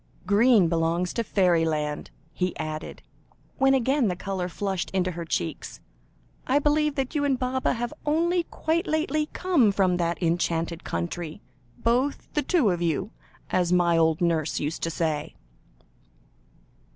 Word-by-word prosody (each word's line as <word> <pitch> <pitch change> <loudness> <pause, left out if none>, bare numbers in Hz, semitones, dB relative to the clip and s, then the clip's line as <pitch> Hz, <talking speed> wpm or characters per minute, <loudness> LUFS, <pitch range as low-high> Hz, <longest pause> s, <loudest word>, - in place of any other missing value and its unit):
"Green 210 -2 +5
belongs 165 +2 0
to 230 - -1
fairyland," 165 -7 +1 0.2
he 180 +1 -2
added, 155 -1 -6 0.6
when 270 0 +5
again 265 0 +2
the 180 - -1
colour 185 0 -3
flushed 190 0 -3
into 185 -1 +1
her 170 -1 -6
cheeks. 85 - -3 0.7
"I 270 - +3
believe 295 0 +2
that 270 0 -2
you 295 -2 0
and 275 -2 +2
Baba 255 +1 0
have 240 0 -3
only 335 +3 +1
quite 335 +4 -1
lately 310 -1 0
come 325 - +3
from 190 -2 +2
that 170 -1 0
enchanted 170 -1 -1
country 155 - -4 0.3
both 250 - 0
the 295 - +1
two 280 - +2
of 175 -1 -2
you, 170 +5 -1 0.4
as 180 -1 +1
my 175 -1 +3
old 160 0 +2
nurse 165 -3 +1
used 150 +3 -3
to 165 - -1
say." 160 -2 -2
185 Hz, 145 wpm, -26 LUFS, 165-265 Hz, 0.7 s, Green